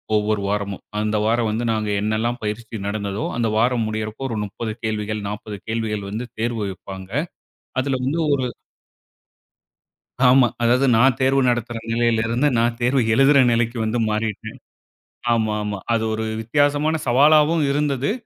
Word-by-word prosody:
ஒவ்வொரு 105 0 +1
வாரமும். 100 -1 -3 0.2
அந்த 105 0 0
வாரம் 115 0 +1
வந்து, 115 +3 -2
நாங்க 110 -1 -2
என்னால்லாம் 110 +3 -1
பயிற்சி 110 +1 -4
நடந்ததோ, 100 0 -3
அந்த 115 -2 +1
வாரம் 120 0 +2
முடியறப்போ, 110 +3 -4
ஒரு 110 - -3
30 110 +2 -5
கேள்விகள், 110 -1 -2
40 105 0 -6
கேள்விகள் 110 -3 -2
வந்து 115 +4 -4
தேர்வு 115 -1 -1
வெப்பாங்க. 95 0 -10 0.7
அதுல 135 0 -1
வந்து 155 +5 0
ஒரு 130 -2 -1 1.8
ஆமா, 130 -1 +6 0.2
அதாவது 125 +3 +3
நான் 125 +2 +4
தேர்வு 135 +1 +3
நடத்துற 120 -1 -2
நிலையில 115 -1 +2
இருந்து, 120 +6 +1
நான் 115 +1 +2
தேர்வு 125 +2 +2
எழுதுற 135 +4 +5
நிலைக்கு 115 +1 0
வந்து 110 +2 -1
மாறிட்டேன். 110 -1 -3 0.8
ஆமா 110 -2 +1
ஆமா. 105 -1 -3
அது 115 -1 +1
ஒரு 110 0 -2 0.2
வித்தியாசமான 145 +6 +1
சவாலாவும் 150 +5 +4
இருந்தது. 140 0 0
115 Hz, 140 wpm, -21 LUFS, 110-125 Hz, 1.8 s, ஆமா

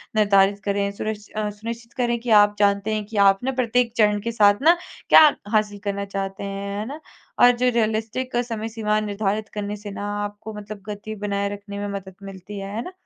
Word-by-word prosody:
निर्धारित 200 -1 +4
करें, 200 0 0
सुनि 215 +2 -3 0.2
अ, 215 -1 -1
सुनिश्चित 230 +3 -7
करें 240 -2 0
कि 240 - -6
आप 205 0 -1
जानते 200 +1 +2
हैं 215 -1 -2
कि 215 0 -7
आप 195 +2 +3
ना 265 - 0
प्रत्येक 240 0 +1
चरण 210 -2 +4
के 230 - -3
साथ 205 -1 +4
ना, 335 +4 +6 0.3
क्या 310 - +9 0.2
हासिल 210 -2 +1
करना 200 -1 -2
चाहते 195 0 -4
हैं, 200 0 -4
है 215 - -3
ना? 285 +5 -7 0.4
और 245 - +9
जो 250 +1 +3
रियलिस्टिक 225 +3 -1
समय 225 -1 -4
सीमा 215 -1 0
निर्धारित 210 0 -2
करने 210 0 -3
से 205 0 -8
ना, 200 0 -5 0.2
आपको 205 +1 -7
मतलब 210 0 -8
गति 210 +1 -6
बनाए 200 -1 -2
रखने 200 0 -8
में 205 - -3
मदद 190 -1 -8
मिलती 195 +1 -9
है, 195 +1 -6
है 230 - -2
ना? 360 - -8
210 Hz, 205 wpm, -23 LUFS, 200-225 Hz, 0.4 s, क्या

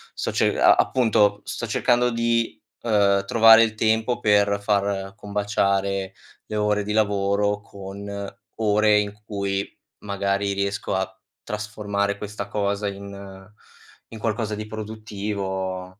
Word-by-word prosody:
sto - - -2
ce - - +1
a - - +7
appunto 105 -5 +2
sto 115 - -5
cercando 125 +2 +2
di, 115 0 0 0.2
eh, 100 -3 +3
trovare 115 0 +7
il 110 -1 -1
tempo 110 +2 +1
per 100 -1 +3
far 100 -1 0
combaciare 100 -2 -1 0.3
le 105 - -5
ore 105 -1 +1
di 105 +1 -3
lavoro, 105 -1 +1
con 100 0 -7 0.2
ore 105 -1 +3
in 105 0 -2
cui 100 -2 -2 0.3
magari 100 0 -1
riesco 100 0 -2
a 95 0 -3 0.2
trasformare 105 -2 -2
questa 105 -1 -6
cosa 100 0 -1
in 100 -1 -8 0.7
in 110 - -8
qualcosa 110 -1 -1
di 105 0 -6
produttivo. 100 -3 -5
100 Hz, 125 wpm, -23 LUFS, 100-105 Hz, 0.7 s, a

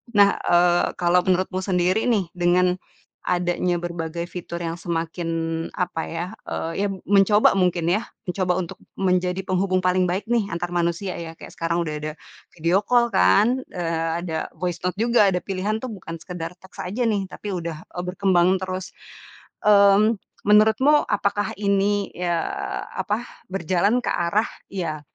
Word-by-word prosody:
Nah, 200 -1 +5
eee, 175 0 +3
kalo 175 +1 +4
menurutmu 185 0 +1
sendiri, 185 +2 +1
nih, 205 -8 +1
dengan 180 +1 +3 0.5
adanya 175 0 0
berbagai 170 0 -4
fitur 175 -1 -6
yang 165 0 -3
semakin, 170 0 -3 0.4
apa 180 -2 -2
ya, 165 +1 -4 0.2
eee, 165 - -3
ya - - +2 0.2
mencoba 200 0 +5
mungkin 175 -2 +1
ya, 205 +6 +1 0.2
mencoba 180 0 +1
untuk 170 - -7 0.2
menjadi 180 0 +1
penghubung 185 0 0
paling 185 0 +2
baik, 185 +5 -2
nih, 235 -4 +2
antar 175 +1 -3
manusia 175 +2 -1
ya, 165 -1 -6
kayak - - -12
sekarang 170 +1 0
udah 155 -3 -3
ada 155 0 -4 0.4
video 170 +3 +2
call, 240 -1 +3
kan, 225 - +3
eee, 165 -2 -1
ada 160 -2 -3
voice 175 -2 -3
note 180 - +1
juga, 230 -1 +4
ada 180 - 0
pilihan 200 +3 -2
tuh 255 - -4
bukan 185 -6 -7
sekedar 175 -2 -6
teks 190 - -17
aja, 205 +7 -3
nih, 200 -2 0
tapi 205 +2 -8
udah, 170 -4 -4 0.2
eee, 175 - -2
berkembang 185 0 +2
terus. 185 0 -5 0.7
Eee, 205 +1 +6 0.3
menurutmu 220 +8 +5
apakah 205 0 0
ini, 200 0 +1
ya, 175 -1 -1 0.6
apa, 220 +3 -2 0.2
berjalan 195 +5 +1
ke - - 0
arah, 175 +6 +1 0.2
ya 165 -6 -3
180 Hz, 155 wpm, -23 LUFS, 175-200 Hz, 0.7 s, Eee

